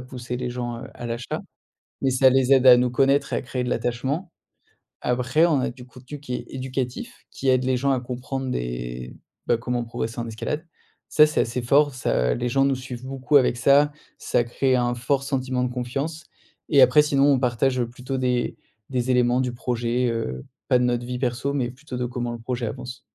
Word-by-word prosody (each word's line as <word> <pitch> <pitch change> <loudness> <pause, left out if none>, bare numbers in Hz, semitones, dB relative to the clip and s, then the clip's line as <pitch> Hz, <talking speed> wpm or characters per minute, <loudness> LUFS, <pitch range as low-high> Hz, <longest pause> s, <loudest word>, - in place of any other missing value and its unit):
pousser 125 -1 -6
les 125 0 -3
gens, 120 -1 -4
heu, - - -9
à 120 - -7
l'achat. 115 +1 -4 0.6
Mais 135 - +2
ça 130 +1 +5
les 130 0 +3
aide 130 -1 +5
à 125 -1 +10
nous 125 0 +2
connaître 135 +2 +2
et - - +1
à - - -2
créer 125 -1 -3
de 125 - -2
l'attachement. 135 +9 -2 0.7
Après, 125 +6 +2
on 150 -6 +2
a - - -1
du 125 0 -12
contenu 130 +3 -11
qui 125 -4 -5
est - - -4
éducatif, 130 -1 -5
qui 135 - -4
aide 130 0 +3
les 130 0 +1
gens 140 +2 +1
à 130 - 0
comprendre 130 +1 -4
des - - -4 0.3
bah, 120 - +3
comment 120 +1 -2
progresser 115 0 -5
en 115 - -3
escalade. 150 +8 -4 0.4
Ça, 150 - +6
c'est 150 - 0
assez 120 +1 -1
fort, 140 +3 +3
ça 60 - +1
les 120 0 -2
gens 135 +2 +3
nous 135 - +2
suivent 130 -1 -8
beaucoup 135 +2 +1
avec 125 -2 +1
ça, 140 +3 +4 0.3
ça 120 - +1
crée 130 +2 +1
un 120 0 +1
fort 130 +3 0
sentiment 130 -2 -1
de 125 - -2
confiance 140 +6 -4 0.5
et 140 -3 +6
après 130 +4 +7
sinon 145 -1 +3
on 135 - +3
partage, 125 +1 +1
heu, 120 - -1
plutôt 125 +2 -5
des 125 -1 0 0.3
des 125 -1 -1
éléments 125 0 +3
du 125 -1 -1
projet, 120 0 -1
heu, 65 - -3 0.2
pas 125 - +4
de 125 - +1
notre 120 0 0
vie 125 0 -4
perso, 125 +2 -1
mais 125 -4 -1
plutôt 130 0 -9
de 125 - -2
comment 120 -1 -3
le 120 - -6
projet 120 +1 -3
avance. 120 +2 -7
125 Hz, 215 wpm, -24 LUFS, 120-135 Hz, 0.7 s, à